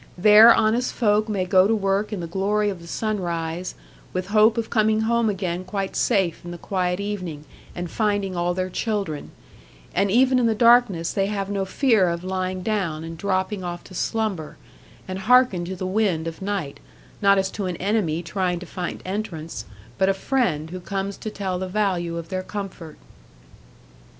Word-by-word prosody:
There 210 +5 +8
honest 230 +3 +2
folk 215 -1 +2
may 195 -3 0
go 185 0 +5
to 225 - +2
work 200 +1 0
in 205 -4 -3
the - - -3
glory 205 +4 0
of 185 -3 -8
the 170 - -12
sunrise, 175 -4 -3 0.4
with 185 +1 -3
hope 215 +2 +4
of 230 -1 -2
coming 215 -1 +2
home 230 0 +2
again 185 -3 -2
quite 195 +1 -4
safe 185 -5 +1
in 175 - -8
the 175 - -6
quiet 180 0 -1
evening, 185 -7 -4 0.3
and 175 0 -4
finding 205 -1 -1
all 175 0 0
their 185 0 -2
children; 200 -9 -2 0.6
and 200 - +2
even 255 +4 +4
in 240 - +3
the 225 - +1
darkness 230 -7 +4
they 195 -1 +1
have 200 -1 -3
no 195 -1 -1
fear 215 -3 +3
of 170 +1 -3
lying 185 0 -3
down, 180 -8 -1
and 165 0 -7
dropping 190 +2 -1
off 175 -1 -5
to 190 - -14
slumber, 195 -5 -2 0.5
and 185 0 -4
hearken 235 -4 +4
to 190 +2 -5
the 185 - -5
wind 185 -4 0
of 165 +2 -7
night, 190 -8 -3 0.4
not 200 -1 +5
as 190 0 0
to 200 -3 -3
an 180 - -3
enemy 180 -4 0
trying 180 -1 -1
to 180 - -8
find 175 0 -5
entrance, 175 - -5 0.3
but 190 - +4
a 195 - +2
friend 185 - -1
who 185 - -5
comes 195 +2 -3
to 215 - -6
tell 190 -3 -3
the 190 - -3
value 180 -4 -1
of 165 -1 -7
their 185 0 -2
comfort. 185 -5 -7
190 Hz, 185 wpm, -23 LUFS, 175-210 Hz, 0.6 s, There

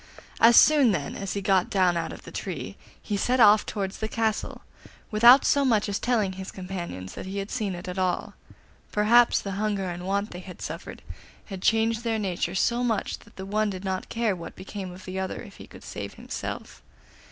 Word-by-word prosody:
As 230 +1 +7
soon, 285 -8 +6
then, 145 -6 -3
as 195 -1 -4
he 200 - -3
got 190 -2 +2
down 185 -3 +3
out 170 - -2
of - - -10
the - - -10
tree - - -5 0.2
he 210 - -3
set 250 +5 +1
off 210 -2 +6
towards 195 -3 -4
the 220 - -2
castle, 220 -1 -2 0.5
without 235 +5 +7
so 285 - +3
much 225 -6 +2
as 200 -1 -2
telling 220 -6 +1
his 190 +1 -7
companions 175 - -6
that - - -7
he 195 +1 -5
had 200 +1 -4
seen 210 -6 -2
it 175 +2 -8
at 180 +1 -4
all; 185 -1 -1 0.6
perhaps 230 +3 +5
the 200 - -5
hunger 200 -4 -1
and 175 +1 -6
want 200 +2 -1
they 175 - -7
had 180 0 -11
suffered - - -7 0.4
had 195 -3 -8
changed 225 +1 +2
their 225 -2 0
nature 185 -3 -2
so 235 +5 +1
much 225 -4 -1
that - - -20
the 190 - -7
one 215 +2 0
did 190 0 -6
not 190 -1 -3
care 230 -4 0
what 170 - -9
became 190 -1 -7
of 180 +1 -12
the 190 0 -4
other 190 0 -3
if - - -13
he - - -11
could - - -14
save - - -7
himself. - - -6
200 Hz, 210 wpm, -26 LUFS, 185-225 Hz, 0.6 s, As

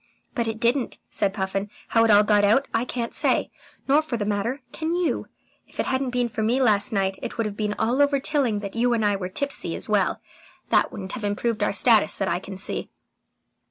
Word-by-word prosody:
"But 235 -4 -1
it 220 -1 -3
didn't," 240 +2 0
said 200 - 0
Puffin. 195 0 -3 0.2
"How 225 - +4
it 225 - +3
all 210 0 +7
got 205 -1 +3
out, 220 +7 +3
I 225 +2 +1
can't 240 -2 -4
say, - - +1 0.4
nor 285 +3 +5
for 290 -6 -4
that 205 -2 -2
matter 225 +7 -1
can 325 +1 -2
you. 355 -1 -1 0.4
If - - -18
it - - +1
hadn't 260 0 0
been 245 -1 0
for 220 -1 -4
me 230 +4 +2
last 215 -4 +3
night, 195 -2 0
it - - -6
would 230 - 0
have 210 -1 -4
been 210 -1 -2
all 240 +5 +1
over 285 -1 +3
Tilling 265 -8 0
that 200 0 -6
you 240 +1 +2
and 220 -2 +1
I 205 -1 +2
were 185 -2 -4
tipsy 280 +9 -1
as - - -6
well. - - +1 0.5
That - - +3
wouldn't 190 -1 -6
have 235 - -6
improved 210 +2 -1
our 205 - +2
status 220 +2 +3
that 195 - -1
I 170 0 0
can 190 0 -9
see." 190 - -2
225 Hz, 230 wpm, -24 LUFS, 205-250 Hz, 0.5 s, all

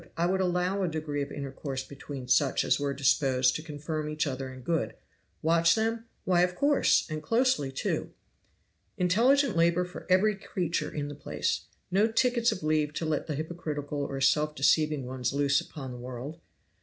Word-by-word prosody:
I 170 - +2
would 190 +2 +1
allow 180 +2 0
a 185 - +1
degree 155 -3 -3
of 140 - -4
intercourse 135 -1 -5
between 140 -2 -8
such 135 +2 +3
as - - +2
were 140 -1 -1
disposed 130 -2 +2
to - - -3
confirm 150 0 -4
each 150 +1 -1
other 130 -2 -4
in 130 0 -10
good. 165 +5 -1 0.5
Watch 165 +1 +4
them? 225 +1 -1 0.2
why, 180 -2 +3
of 180 0 +1
course 285 +6 +3
and 155 -1 -4
closely, 230 - +1
too. 135 - -2 0.9
"Intelligent 235 +7 +3
labor 170 +2 +3
for 180 - -10
every 200 +3 +4
creature 175 -3 -2
in 145 -1 -3
the 145 - -6
place. 145 - -2 0.3
No 200 +4 +4
tickets 240 0 +2
of 185 - -5
leave 155 -1 +1
to 160 - -3
let 155 -2 -1
the 150 - -2
hypocritical 150 -2 -4
or 135 -1 -4
self 150 +3 +2
deceiving 150 0 +2
ones 125 0 -2
loose 140 0 +2
upon 135 -4 -8
the 125 - -8
world. 130 +6 -7
155 Hz, 180 wpm, -29 LUFS, 140-180 Hz, 0.9 s, Watch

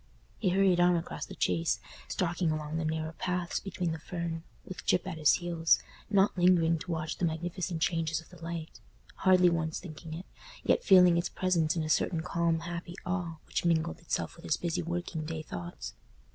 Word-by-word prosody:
He 195 - +2
hurried 190 -1 +4
on 175 0 +5
across 170 - -4
the - - -9
Chase, 85 -2 +1 0.3
stalking 175 -1 0
along 155 0 -2
the 160 - -1
narrow 160 0 -1
paths 180 +1 -2
between 180 -3 -3
the 160 - -4
fern, 170 0 -4 0.2
with 185 - -8
Gyp 180 - +2
at 175 -4 -5
his 150 - +6
heels, 170 -2 +3 0.3
not 200 -1 +4
lingering 175 -3 +4
to 180 - -9
watch 155 -1 -2
the 180 - +2
magnificent 170 +1 -2
changes 165 -2 0
of 165 - -14
the 175 -2 -14
light—hardly 175 +2 +1
once 160 -1 -1
thinking 160 -2 -8
of 170 - -5
it—yet - - -2
feeling 180 -4 +7
its 170 - 0
presence 170 -4 +1
in 165 - 0
a - - -3
certain 160 +1 +1
calm 170 -1 +1
happy 170 +1 -5
awe 175 -3 -2
which - - -2
mingled 170 0 +1
itself 170 - -2
with 170 - -13
his 155 - +1
busy 175 0 -1
working 175 -1 -3
day 155 0 -4
thoughts. 85 - -6
170 Hz, 185 wpm, -30 LUFS, 160-180 Hz, 0.3 s, feeling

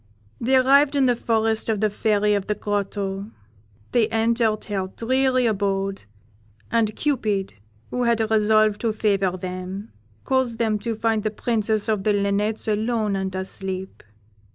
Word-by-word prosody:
"They 260 +3 +2
arrived 275 +3 +4
in 275 -2 +3
the 245 -1 +3
forest 225 -1 0
of 215 -2 +1
the 215 0 +1
Fairy 210 0 +1
of 200 -2 -1
the 210 - 0
Grotto; 200 -1 -3 0.6
they 235 -3 +3
entered 225 -1 +1
her 195 -3 -2
dreary 255 +4 +1
abode, 195 - -1 0.7
and 225 -2 +1
Cupid, 215 -10 -1 0.4
who 250 0 0
had 235 -1 +2
resolved 215 -1 +3
to 225 -2 0
favour 195 -4 +1
them, 185 +3 -6 0.3
caused 260 -3 0
them 220 -2 0
to 230 +1 -3
find 220 0 0
the 215 - -1
Princess 215 -1 -1
of 215 -3 0
the 210 - +2
Linnets 205 +2 0
alone 215 -1 0
and 190 -1 -3
asleep. 190 0 -5
215 Hz, 150 wpm, -23 LUFS, 200-230 Hz, 0.7 s, arrived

